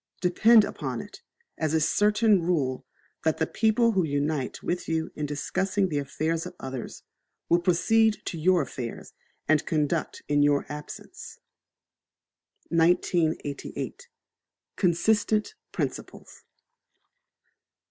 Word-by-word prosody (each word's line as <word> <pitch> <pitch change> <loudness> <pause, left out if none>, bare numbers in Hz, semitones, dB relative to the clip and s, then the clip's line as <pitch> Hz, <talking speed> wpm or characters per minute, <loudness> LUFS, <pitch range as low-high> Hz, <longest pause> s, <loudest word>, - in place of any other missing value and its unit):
Depend 215 +5 +5
upon - - -4
it, - - -10 0.4
as 155 0 0
a - - +4
certain 210 +4 +3
rule, 150 -7 -1 0.4
_that 160 -1 +1
the 160 - +1
people 225 +5 +2
who 190 -4 +1
unite 145 -2 -2
with 175 -1 -3
you 160 -1 -1
in 150 -1 -4
discussing 190 +6 -1
the 145 -3 -1
affairs 160 +5 -2
of 180 - -11
others 130 -2 -7 0.5
will 170 - +4
proceed 215 +5 +3
to - - -4
your 175 +1 +3
affairs 120 -3 -7 0.3
and 155 0 +3
conduct 155 +1 -1
in 145 0 +2
your 145 -1 +3
absence_. 150 0 -9 1.3
1988. 165 - 0 0.7
Consistent 210 - +1 0.2
Principles. - - -6
165 Hz, 110 wpm, -26 LUFS, 150-195 Hz, 1.3 s, Depend